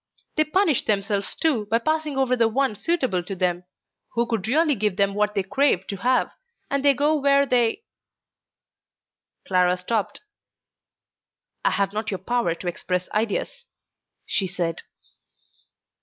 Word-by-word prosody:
They 310 - +3
punish 320 - +2
themselves 200 -1 -1
too 250 -10 0
by 225 - +2
passing 310 +3 -1
over 260 -2 +2
the 230 -2 +3
one 265 +1 +1
suitable 255 - 0
to 190 +3 -6
them, 180 -1 -1 0.5
who 235 0 +1
could 225 -4 -2
really 305 +5 +3
give 210 -5 -1
them 200 0 +2
what 210 0 0
they 195 - +1
crave 195 -3 +1
to 200 - -5
have, 250 +5 +1 0.4
and 280 0 0
they 280 -1 +5
go 295 +4 +2
where 280 -1 +3
they.. 250 - +1 0.8
." - - -63
Clara 180 -1 +3
stopped. 205 +3 -2 1.4
"I - - +4
have 200 0 0
not 215 0 -3
your 195 - -2
power 190 -3 -1
to 175 - -8
express 180 +1 -3
ideas," 215 -1 -2 0.6
she 195 - -1
said. 175 -3 -3
220 Hz, 150 wpm, -24 LUFS, 195-275 Hz, 1.4 s, they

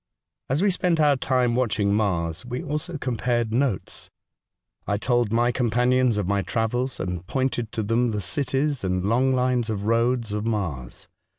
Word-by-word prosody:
As 140 +8 +1
we 205 - +4
spent 175 -2 +1
our 145 -2 +5
time 125 -2 +1
watching 110 -5 +1
Mars, 85 -6 0
we 125 +4 -5
also 155 +2 -3
compared 120 -3 -1
notes. 125 -5 -1 0.8
I 100 - +1
told 120 0 +1
my 120 +1 +3
companions 125 0 +2
of 100 -3 -1
my 100 0 +1
travels, 120 +5 -1
and 90 -2 -3
pointed 130 -3 -1
to 110 - -1
them 115 +3 +1
the 105 -2 -2
cities 135 - -1
and 90 0 -1
long 125 +5 +2
lines 125 -2 +1
of 100 -2 -3
roads 115 0 +1
of 105 0 -2
Mars. 85 - -3
120 Hz, 165 wpm, -24 LUFS, 105-130 Hz, 0.8 s, our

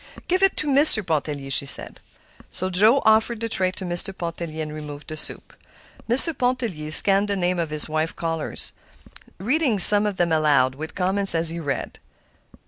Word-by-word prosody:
"Give 370 +2 -1
it 390 -1 +1
to 305 - -3
Mr. 275 -7 +4
Pontellier," 145 -4 -4
she 140 +1 +3
said. - - -2 0.5
Joe 200 +8 +1
offered 220 +1 +1
the 230 - -4
tray 190 -4 -1
to 190 - -9
Mr. 175 +2 -4
Pontellier, 165 -2 -7
and 150 0 -9
removed 150 -1 -10
the 155 - -7
soup. 155 - -4 0.6
Mr. 270 +7 +3
Pontellier 235 -12 -4
scanned 195 +5 +2
the 200 - -3
names 180 -1 -2
of 165 - -5
his 150 0 +1
wife's 155 +1 -3
callers, 165 -2 -4 0.6
reading 250 - -1
some 205 +2 +8
of 200 -2 -5
them 175 -1 -1
aloud, 145 -5 +1
with 155 +4 -10
comments 190 0 +3
as 165 0 +4
he 170 +1 -4
read. 145 -4 -6
175 Hz, 175 wpm, -21 LUFS, 155-215 Hz, 0.6 s, some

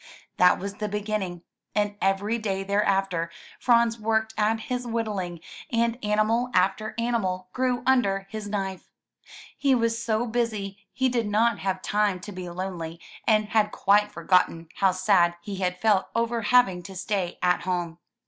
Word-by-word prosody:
That 180 - +6
was 200 +1 -5
the 210 - -2
beginning, 200 -4 -3 0.3
and 205 -1 +1
every 200 +4 +1
day 195 -3 -2
thereafter 195 -4 +1 0.3
Franz 235 -1 +3
worked 220 0 0
at 220 +1 +1
his 250 +1 -3
whittling, 205 -7 -3 0.3
and 235 +1 0
animal 215 +4 +1
after 195 +4 +1
animal 190 -6 -1
grew 255 -1 0
under 200 -7 +2
his 215 -1 -5
knife. 195 -2 -4 0.7
He 275 -2 +3
was 230 -1 0
so 225 0 0
busy 210 -4 -3
he 260 - +1
did 240 -3 0
not 220 +2 +2
have 190 -1 -2
time 205 -3 +1
to 205 - -8
be 185 -2 -6
lonely, 175 -2 -5 0.3
and 215 -1 +3
had 215 -1 +2
quite 205 +1 +3
forgotten 170 -1 +1
how 195 -1 +4
sad 185 -2 +3
he 195 +3 -6
had 180 -1 -1
felt 210 -3 +3
over 230 0 0
having 210 -6 +3
to 190 +2 -10
stay 185 -1 -2
at 180 0 +3
home. 175 -2 -3
205 Hz, 160 wpm, -26 LUFS, 185-225 Hz, 0.7 s, That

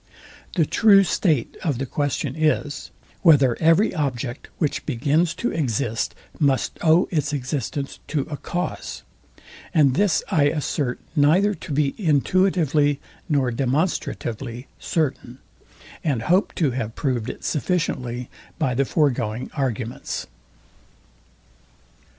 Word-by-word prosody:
The 165 -5 +3
true 200 +3 +6
state 160 - +1
of 150 -8 0
the 135 - -2
question 145 0 -2
is, 155 -2 0 0.3
whether 140 -8 +5
every 165 +6 +4
object, 130 -5 -3
which 150 -4 -1
begins 150 +6 +1
to 240 - -1
exist, 120 -6 -1 0.2
must 140 -3 +1
owe 165 +2 +4
its 150 -3 0
existence 140 0 -3
to 150 -2 0
a 145 +2 -5
cause: 175 +5 -4 0.7
and 145 -5 +5
this 200 +4 +2
I 145 -3 +4
assert 145 -3 -1 0.2
neither 170 +8 +4
to 160 - -9
be 140 -1 +1
intuitively 155 -3 +2 0.3
nor 135 -5 +2
demonstratively 130 - -2
certain, 130 -6 -2 0.7
and 135 -8 0
hope 180 - +2
to 150 -6 +1
have 115 -3 -4
proved 125 -6 -1
it - - -8
sufficiently 130 -7 -1 0.3
by 130 - 0
the 135 +3 +1
foregoing 125 -6 0
arguments. 125 -4 -3
145 Hz, 115 wpm, -23 LUFS, 130-160 Hz, 0.7 s, true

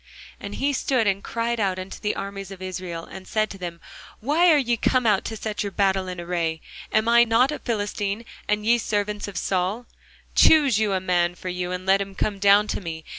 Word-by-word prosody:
And - - -7
he 280 +1 0
stood 255 -3 +1
and 195 -1 0
cried 235 0 -2
unto 185 -2 -2
the 210 - -1
armies 195 -1 -6
of 195 -2 -9
Israel, 185 -3 -5
and 190 -1 -11
said 215 - +1
unto 195 - -9
them, 170 -2 -6 0.4
Why 310 +9 +3
are 305 - +6
ye 240 -4 +1
come 250 +2 +1
out 210 -3 +3
to 220 - -4
set 215 0 -4
your 200 - -3
battle 190 -1 +1
in 180 -1 -5
array? 170 -2 -2 0.3
Am 220 0 +2
not 235 +3 +4
I - - -2
a - - -9
Philistine, 205 -1 -2 0.2
and 210 0 0
ye 235 +1 +4
servants 210 -1 -2
to 200 - -8
Saul? 190 +6 -1 0.5
Choose 285 -9 +5
you 210 -2 +1
a 190 - +1
man 175 -1 +1
for 185 - -6
you, 180 0 -3
and 180 0 -4
let 195 +1 +4
him 195 0 -6
come 200 0 -2
down 200 +1 +5
to - - -2
me. 160 -3 -6
200 Hz, 220 wpm, -24 LUFS, 185-225 Hz, 0.5 s, are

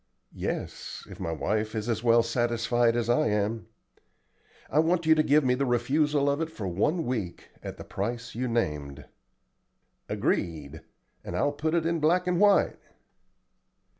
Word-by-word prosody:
"Yes, - - -5
if - - -10
my 80 - -3
wife 105 +7 -1
is 110 +1 -3
as 115 -1 -1
well 115 -1 +5
satisfied 120 0 +1
as 120 -1 0
I 120 +6 +3
am. 105 0 -1 1.0
I 150 - +1
want 165 +1 +2
you 160 - +6
to 155 - +3
give 150 0 +3
me 125 -1 +3
the 130 +2 0
refusal 140 +4 +1
of 140 +2 +1
it 165 - -2
for 105 -10 -5
one 150 - 0
week 110 -8 -4
at - - -7
the - - -8
price 115 +4 -4
you 125 +3 -2
named." 75 - -2 1.0
"Agreed, 80 -2 -2 0.4
and - - -6
I'll 145 - +1
put 155 +3 -1
it 165 -2 +1
in 170 0 0
black 175 +4 +2
and 180 -1 +1
white." 205 -1 +4
120 Hz, 165 wpm, -27 LUFS, 110-155 Hz, 1.0 s, you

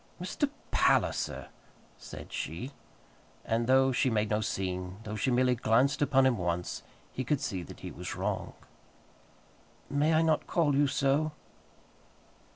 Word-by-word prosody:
"Mr. - - -1 0.2
Palliser!" - - +1 0.5
said - - -10
she; 120 - -4 0.7
and 115 +1 0
though 130 +1 +5
she 130 +1 +2
made 110 -2 0
no 105 +1 +2
scene, 90 -2 -3
though 110 -1 -5
she 110 - 0
merely 125 0 +3
glanced 125 +5 +2
upon 135 -2 +4
him 125 -5 +2
once, 90 0 -2 0.3
he 130 - -3
could 145 +2 +1
see 95 -7 -3
that 85 - -11
he - - -6
was - - -6
wrong. - - -2 1.4
"May 150 +3 +3
I 160 - +4
not 160 -2 +1
call 150 -5 +2
you 145 +1 +4
so?" 140 +3 +1
130 Hz, 145 wpm, -30 LUFS, 105-140 Hz, 1.4 s, though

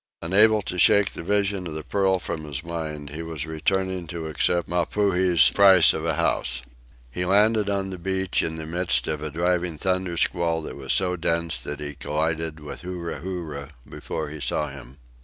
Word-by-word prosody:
Unable 105 +5 +4
to 90 -1 -4
shake 100 +2 +5
the - - -6
vision 100 0 0
of 80 - -6
the 80 - -4
pearl 95 +3 +1
from 85 -3 -5
his 75 0 -5
mind, 75 -3 -5
he 75 +2 -5
was 80 -2 -4
returning 90 +3 -1
to 85 0 -5
accept 85 +2 0
Mapuhi's 90 -2 +3
price 95 -4 +7
of 80 - -4
a 80 -2 0
house. 65 -2 0 0.5
He 90 - -3
landed 105 +3 +3
on 100 -1 -1
the 90 - -7
beach 95 +1 0
in 80 - -3
the 80 -1 -6
midst 80 -6 +1
of 75 -1 -2
a 75 - -3
driving 85 +1 0
thunder 95 0 -1
squall 85 -2 0
that - - -7
was 65 -1 -4
so 90 -1 +2
dense 85 -1 -1
that 75 0 -6
he 75 0 -5
collided 80 +2 -2
with 75 -1 -8
Huru 90 -1 -5
Huru 80 -6 -5 0.2
before - - -5
he 75 0 -8
saw 65 - -1
him. - - -11
85 Hz, 190 wpm, -24 LUFS, 75-95 Hz, 0.5 s, price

